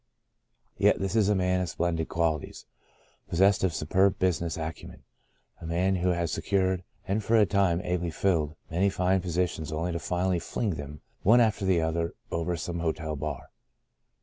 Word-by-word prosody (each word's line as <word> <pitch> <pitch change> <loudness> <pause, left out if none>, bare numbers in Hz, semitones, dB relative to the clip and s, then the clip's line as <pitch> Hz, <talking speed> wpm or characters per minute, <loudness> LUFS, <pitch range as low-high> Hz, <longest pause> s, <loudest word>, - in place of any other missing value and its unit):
Yet - - +4
this 95 +2 -2
is 105 -3 +3
a 105 - +3
man 90 -1 +1
of 90 - -2
splendid 80 0 -1
qualities, 80 -3 -2 0.6
possessed 95 +3 +3
of 95 - +2
superb 95 +5 +2
business 85 -3 0
acumen 80 0 -7 0.3
— - - -36
a 80 - -6
man 90 +3 +1
who 90 +1 +1
has 85 -2 0
secured, 95 -1 0 0.2
and 100 +3 0
for 115 +3 +3
a 105 - +6
time 95 -3 +2
ably 90 -1 -1
filled, 80 -3 0 0.2
many 95 +4 +2
fine 95 0 +1
positions 85 -3 -2
only 80 +3 -2
to 85 - -2
finally 90 +1 0
fling 105 +5 -2
them 75 -2 -7 0.2
one 115 +5 +6
after 110 -4 +2
the 90 -3 +3
other 85 +1 -1 0.2
over 85 +1 -1
some 85 +1 -4
hotel 80 -2 -2
bar. 75 -1 -5
90 Hz, 175 wpm, -28 LUFS, 80-95 Hz, 0.6 s, a